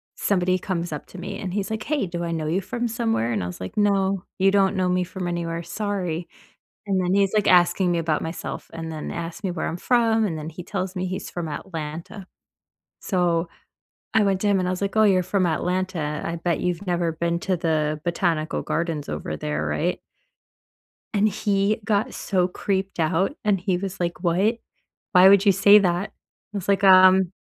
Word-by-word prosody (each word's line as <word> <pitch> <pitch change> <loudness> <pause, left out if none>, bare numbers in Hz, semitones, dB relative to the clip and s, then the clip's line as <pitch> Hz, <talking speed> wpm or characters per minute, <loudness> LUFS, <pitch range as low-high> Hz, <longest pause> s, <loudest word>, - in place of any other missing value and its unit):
somebody 185 -2 +1
comes 175 -3 -3
up 150 - -5
to - - -12
me, 180 - -6
and 185 -2 -4
he's 200 -1 -2
like, 220 0 -3
"Hey, 290 -5 -1
do 175 0 -4
I 170 - -2
know 160 -2 -2
you 180 +5 0
from 240 +5 -3
somewhere?" 225 - -1
And 100 -5 -1
I - - -3
was 90 - -8
like, 95 - -7
"No, 195 -2 +2 0.2
you 195 - +5
don't 195 0 +3
know 185 -1 +1
me 180 0 +1
from 180 0 -5
anywhere, 170 -1 -3
sorry." 180 -3 -3 0.6
And 190 -1 +1
then 180 +1 0
he's, 200 -1 +2
like, 210 -1 +2
asking 180 0 +4
me 170 - +1
about 160 -2 0
myself 165 +2 -6
and 165 0 -5
then 155 -1 -5
asked 170 +3 -6
me 190 - -1
where 175 - -3
I'm 170 - -4
from, 225 0 +2
and 165 -5 -2
then 155 +1 -6
he 175 +2 -9
tells 185 0 -4
me 185 0 -2
he's 185 - -5
from 175 -2 -4
Atlanta; 165 +4 -6 0.7
so, 175 -3 0 0.7
I 220 - +5
went 195 -2 +1
to 210 - +2
him, 200 - +3
and 180 -1 0
I - - 0
was 185 +2 -4
like, 200 +2 -2
"Oh, 215 - +6
you're 190 -3 +4
from 185 0 0
Atlanta. 170 -2 -1
I 170 - -3
bet 170 0 -1
you've 180 +2 -2
never 175 -2 0
been 170 +1 -1
to 185 0 0
the 155 -2 0
Botanical 170 -2 -1
Gardens 165 -3 -2
over 75 0 -4
there, 75 0 -3
right?" 75 0 -1 1.2
And 210 +1 +3
he 200 +1 0
got 215 +3 0
so 185 -3 0
creeped 195 0 -3
out, 175 - +1
and 205 -3 +2
he 180 0 0
was 195 +1 -5
like, 175 +1 -3
"What? 190 +7 +2 0.6
Why 185 +1 +8
would 200 +1 +5
you 200 - +7
say 200 +2 +7
that?" 180 0 0 0.4
I - - -2
was 190 - -6
like, 200 0 +2
um, 185 -1 +7
180 Hz, 210 wpm, -24 LUFS, 170-195 Hz, 1.2 s, Why